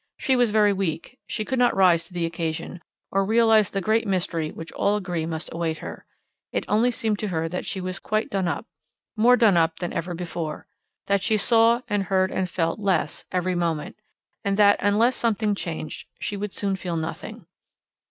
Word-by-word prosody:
She 265 - +1
was 245 -2 +3
very 210 -1 +4
weak; 190 - -3
she 215 - -3
could 260 +2 -1
not 245 -1 +3
rise 175 -3 +4
to - - -18
the 170 -1 0
occasion, 165 +1 -4 0.3
or 195 0 +2
realize 220 -1 +4
the 195 - -2
great 220 +3 +1
mystery 170 -4 -1
which 165 +1 -9
all 205 - +1
agree 175 -5 -3
must 160 0 -5
await 165 -1 -2
her; - - -9 0.4
it - - -2
only 225 +4 +3
seemed 220 -3 -1
to 215 - -2
her 165 -3 -1
that 180 - -4
she 190 - -3
was 185 0 -4
quite 215 +1 -1
done 195 -2 0
up 165 - -2 0.5
more 240 +3 +5
done 215 -7 +5
up 165 0 +2
than 175 0 -4
ever 175 +1 -3
before; 165 -2 -5 0.4
that 200 -1 +1
she 215 +2 +2
saw 230 +2 +4
and 205 -3 0
heard 190 0 +1
and 185 -1 -1
felt 165 +1 -1
less 190 -7 -1
every 185 0 0
moment; 170 -3 -2 0.5
and 200 0 0
that, 205 -1 +5
unless 215 +5 +3
something 215 -2 0
changed, 165 -5 -5
she 205 - -3
would 205 0 -4
soon 195 0 -1
feel 175 -2 -3
nothing. 180 +6 -6
195 Hz, 195 wpm, -24 LUFS, 170-215 Hz, 0.5 s, more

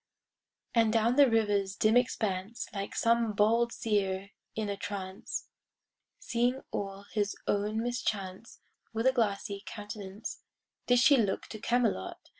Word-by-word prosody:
And 225 -2 +4
down 230 +2 +3
the 280 -2 +7
river's 205 -4 +1
dim 215 +3 +3
expanse 220 -4 0
Like 200 -1 -4
some 230 -1 +2
bold 230 +3 +3
seer 200 -3 -1 0.2
in 220 -1 -1
a 200 - -2
trance, 195 -1 -5 0.7
Seeing 245 +2 0
all 195 0 -4
his 205 -1 0
own 210 +2 0
mischance— 215 -4 -3 0.3
With 225 +2 -1
a 260 - +6
glassy 200 -4 -1
countenance 205 -1 -7 0.5
Did 245 - +5
she 275 +3 +6
look 205 -5 0
to 215 - -7
Camelot. 230 - 0
215 Hz, 130 wpm, -30 LUFS, 200-235 Hz, 0.7 s, the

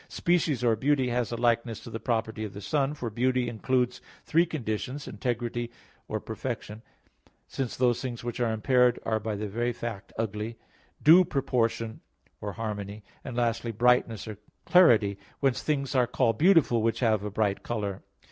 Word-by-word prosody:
Species 160 -7 +1
or 115 -2 +4
beauty 135 +2 +1
has 120 -1 -1
a - - -1
likeness 115 -1 +1
to 115 - -10
the 115 - -4
property 110 -2 -1
of 105 - -6
the 100 - -7
Son. 140 +6 0
For 120 -6 -4
beauty 125 +2 +1
includes 125 +2 0 0.2
three 170 +2 +3
conditions, 130 -1 -4
"integrity" 120 -1 -3 0.4
or - - -2
"perfection," 105 +1 -5 0.7
since 130 -3 -3
those 125 -1 +2
things 120 -3 -5
which 120 0 -4
are 120 -2 +1
impaired 125 +2 +3
are 110 -1 +1
by 110 0 -3
the 105 +1 -3
very 120 +4 -1
fact 115 -3 -6
ugly; 110 +1 -3 0.5
due 170 +5 +8
"proportion" 115 -7 -1 0.4
or 105 -1 -5
"harmony"; 105 -2 -5 0.2
and 125 -3 -6
lastly, 115 -1 0
"brightness" 115 -1 +2
or 105 -2 -7 0.3
"clarity," 110 - +5 0.2
whence 135 -3 +1
things 140 -3 -1
are 125 -2 +3
called 115 -1 +1
beautiful 160 - +5
which 115 +3 0
have 110 -4 +2
a 105 - -3
bright 100 -1 0
color. 105 -5 -3
120 Hz, 165 wpm, -28 LUFS, 110-125 Hz, 0.7 s, due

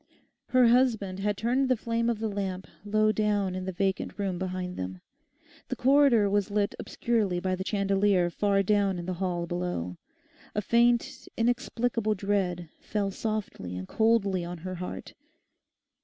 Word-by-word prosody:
Her 255 -2 +5
husband 225 -6 +2
had 205 0 -1
turned 255 +4 +1
the 255 - +3
flame 230 +1 -1
of 235 - 0
the 220 +1 -2
lamp 195 -2 -3 0.2
low 215 +1 +2
down 205 -3 0
in 185 0 -4
the 190 - -2
vacant 190 +1 -2
room 195 -3 -2
behind 185 -1 -3
them; 90 0 -5 0.7
the - - -3
corridor 265 -5 +4
was 205 0 +1
lit 205 0 0
obscurely 210 -7 0
by 185 +1 -1
the 190 - -4
chandelier 195 -2 +2
far 200 +1 +2
down 200 -1 +2
in 175 - -5
the 185 - -2
hall 175 -2 -1
below. 170 - -3 0.6
A 210 - +1
faint, 235 +2 +2
inexplicable 235 -2 0
dread 185 -3 -1
fell 200 -2 -2
softly 210 - -4
and 95 0 -6
coldly 210 -5 +2
on 175 +1 -5
her 185 - -3
heart. 180 0 -6
200 Hz, 155 wpm, -28 LUFS, 185-225 Hz, 0.7 s, Her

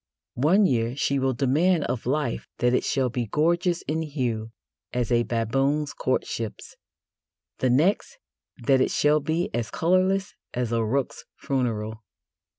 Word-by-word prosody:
One 190 +8 +5
year 120 -5 +1
she 140 0 0
will 130 -1 0
demand 150 +6 +2
of 120 -1 -3
life 140 -2 -1
that 125 +1 +2
it - - +2
shall 130 -4 0
be 120 -1 -2
gorgeous 170 - +1
in 160 +1 -2
hue 125 -8 -3 0.4
as 125 -1 -2
a 120 -1 +4
baboon's 135 +6 0
courtships; 115 -4 -3 0.8
the 130 - +2
next, 175 - +2 0.4
that 135 +1 +2
it - - +2
shall 150 +1 +3
be 160 +4 -1
as 115 -1 -2
colourless 185 +3 +1 0.2
as 120 -2 -1
a 115 -1 +1
rook's 130 +4 -2
funeral. 110 -5 -2
135 Hz, 145 wpm, -25 LUFS, 120-155 Hz, 0.8 s, One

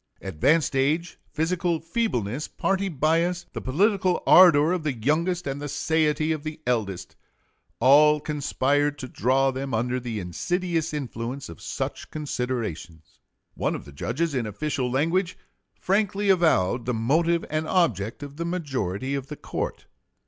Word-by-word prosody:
Advanced 135 - +1
age, 155 +6 0
physical 170 +1 0
feebleness, 155 - -2
party 195 0 -1
bias, 165 +3 +1
the - - -5
political 185 - +1
ardor 165 -4 +7
of 180 -2 0
the 150 -3 -1
youngest 165 +9 0
and 140 0 -4
the 145 - -4
satiety 155 0 +1
of 155 -2 -2
the 155 +1 -6
eldest, 110 -7 -2 0.6
all 150 +4 +6
conspired 145 -1 0
to 130 - -6
draw 135 +2 +2
them 135 -1 -3
under 125 +3 0
the 120 -3 -4
insidious 170 - -2
influence 130 - -5
of 85 - -11
such - - -5
considerations. 110 - -5 0.3
One - - -1
of - - -8
the 70 - -12
judges 145 - -2
in 125 -5 -1
official 130 +3 -2
language 165 +8 0 0.4
frankly 200 +1 +1
avowed 125 - +2
the 125 - 0
motive 165 +9 +1
and 155 +1 -1
object 115 - 0
of 145 0 -9
the 170 - -3
majority 135 - -2
of 140 -1 -3
the 150 - -7
court. - - -5
145 Hz, 145 wpm, -25 LUFS, 125-170 Hz, 0.6 s, ardor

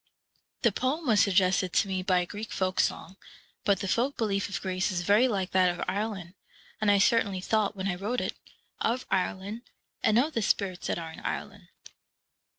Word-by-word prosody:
The 235 - +5
poem 265 - -1
was 220 -5 +4
suggested 185 -2 +2
to - - +3
me 190 -1 -2
by 185 -1 +2
a - - -2
Greek 210 +4 -7
folk 185 -1 -1
song; 190 - -1 0.5
but 200 -2 +2
the 195 - -2
folk 250 +8 0
belief 200 -4 0
of 185 -3 -3
Greece 185 0 -1
is 175 -1 -2
very 210 +7 +4
like 190 -6 -2
that 185 -1 +4
of 175 0 -3
Ireland, 200 -4 -3 0.5
and 215 - +3
I 205 - +6
certainly 200 -2 +3
thought, 210 +2 0
when 190 0 -3
I 195 - 0
wrote 210 +7 -2
it, - - -2 0.5
of 240 +3 0
Ireland, 195 +4 -1 0.4
and 220 0 +3
of 295 +6 +2
the 230 - 0
spirits 195 -3 0
that - - -1
are 165 -1 -6
in - - -10
Ireland. 205 -4 -5
200 Hz, 195 wpm, -28 LUFS, 185-220 Hz, 0.5 s, I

